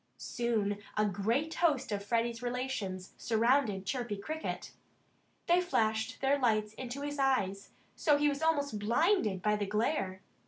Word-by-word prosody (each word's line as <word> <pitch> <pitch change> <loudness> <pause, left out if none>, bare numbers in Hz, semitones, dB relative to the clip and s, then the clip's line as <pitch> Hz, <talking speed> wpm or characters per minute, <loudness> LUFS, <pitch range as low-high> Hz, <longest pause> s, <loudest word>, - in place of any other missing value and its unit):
Soon 215 -4 -1 0.2
a 215 - +4
great 225 - 0
host 290 -9 +1
of 200 -1 -2
Freddie's 230 +2 0
relations 240 -7 -3
surrounded 225 -3 +2
Chirpy 240 -2 -2
Cricket. 315 +10 -5 0.7
They 350 +1 +4
flashed 220 -10 0
their 275 +1 +3
lights 215 -4 +1
in 250 +2 -7
his 285 +3 -4
eyes, 200 -8 +1 0.3
so 300 - +3
that 290 - +4
he 295 - +4
was 285 0 -1
almost 285 -8 +1
blinded 230 - +2
by 210 0 +2
the 205 -1 -2
glare. 205 -3 -1
235 Hz, 150 wpm, -32 LUFS, 205-280 Hz, 0.7 s, a